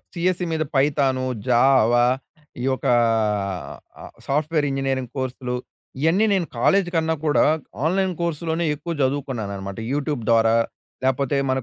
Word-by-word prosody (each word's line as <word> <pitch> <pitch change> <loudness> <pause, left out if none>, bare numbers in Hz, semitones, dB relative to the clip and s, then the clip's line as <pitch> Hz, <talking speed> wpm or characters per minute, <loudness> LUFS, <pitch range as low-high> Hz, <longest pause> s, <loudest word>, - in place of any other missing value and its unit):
CSC 180 +1 0
మీద 160 0 0
Python, 135 -2 +2 0.2
జావ 120 -1 +4 0.7
ఈ - - -3
ఒక - - -10 1.4
సాఫ్ట్‌వేర్ 150 +2 +1
ఇంజినీరింగ్ 135 -2 -2
కోర్స్‌లు. 125 -1 -3 0.5
ఇయన్నీ 170 +8 +3
నేను 185 -4 0
కాలేజ్ 195 +7 +3
కన్నా 160 0 +1
కూడా 150 - +4 0.4
ఆన్‌లైన్ 190 +2 +1
కోర్స్‌లోనే 165 0 -1
ఎక్కువ 170 +4 -5
చదువుకున్నానన్నమాట. 110 -8 -3
యూట్యూబ్ 145 -4 -2
ద్వారా 115 0 +4 0.5
లేపోతే 135 +1 +1
మన 130 0 +1
140 Hz, 115 wpm, -22 LUFS, 130-165 Hz, 1.4 s, జావ